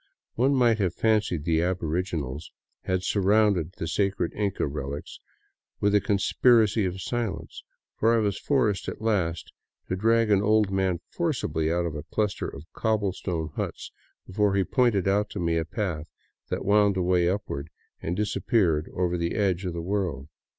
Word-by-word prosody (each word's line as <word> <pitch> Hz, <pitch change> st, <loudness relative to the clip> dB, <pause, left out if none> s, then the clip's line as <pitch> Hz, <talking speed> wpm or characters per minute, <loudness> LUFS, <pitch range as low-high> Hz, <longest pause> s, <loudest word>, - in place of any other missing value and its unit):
One 135 Hz, +4 st, +2 dB
might 120 Hz, -4 st, +3 dB
have 90 Hz, -4 st, 0 dB
fancied 105 Hz, -8 st, +1 dB
the 80 Hz, 0 st, +2 dB
aboriginals 85 Hz, -4 st, -2 dB, 0.3 s
had 95 Hz, 0 st, 0 dB
surrounded 100 Hz, -4 st, +2 dB
the 80 Hz, -5 st, -5 dB
sacred 100 Hz, +4 st, 0 dB
Inca 100 Hz, -2 st, -1 dB
relics 70 Hz, 0 st, -5 dB, 0.6 s
with 100 Hz, 0 st, +2 dB
a 105 Hz, -, +4 dB
conspiracy 110 Hz, +1 st, +3 dB
of 95 Hz, +1 st, -3 dB
silence, 115 Hz, +1 st, -4 dB, 0.3 s
for 115 Hz, +1 st, +3 dB
I -, -, +3 dB
was 105 Hz, -3 st, 0 dB
forced 115 Hz, -9 st, +1 dB
at -, -, -7 dB
last 90 Hz, -8 st, -1 dB, 0.4 s
to -, -, 0 dB
drag 115 Hz, +2 st, +2 dB
an 100 Hz, -1 st, +4 dB
old 105 Hz, -1 st, +3 dB
man 95 Hz, -3 st, 0 dB
forcibly 120 Hz, -, -1 dB
put 85 Hz, +2 st, +1 dB
of 85 Hz, -, -3 dB
a 75 Hz, -, -5 dB
cluster 100 Hz, +5 st, -2 dB
of 70 Hz, -, -9 dB
cobble 110 Hz, -4 st, 0 dB
stone 85 Hz, -4 st, -3 dB
huts -, -, -5 dB, 0.3 s
before 100 Hz, +1 st, +1 dB
he 100 Hz, -, +3 dB
pointed 105 Hz, -1 st, +2 dB
out 105 Hz, +1 st, +2 dB
to 105 Hz, -, -6 dB
me 85 Hz, -1 st, 0 dB
a 80 Hz, -, 0 dB
path 85 Hz, -3 st, -3 dB, 0.4 s
that -, -, -3 dB
wound 100 Hz, -1 st, +4 dB
away 90 Hz, -1 st, +2 dB
upward 90 Hz, -7 st, -3 dB, 0.3 s
and 85 Hz, -, -2 dB
disappeared 95 Hz, -, +1 dB
over 90 Hz, -1 st, 0 dB
the 85 Hz, 0 st, -1 dB
edge 95 Hz, -3 st, 0 dB
of 90 Hz, -, -2 dB
the 85 Hz, 0 st, -4 dB
world. 85 Hz, -7 st, -2 dB
95 Hz, 165 wpm, -26 LUFS, 85-105 Hz, 0.6 s, a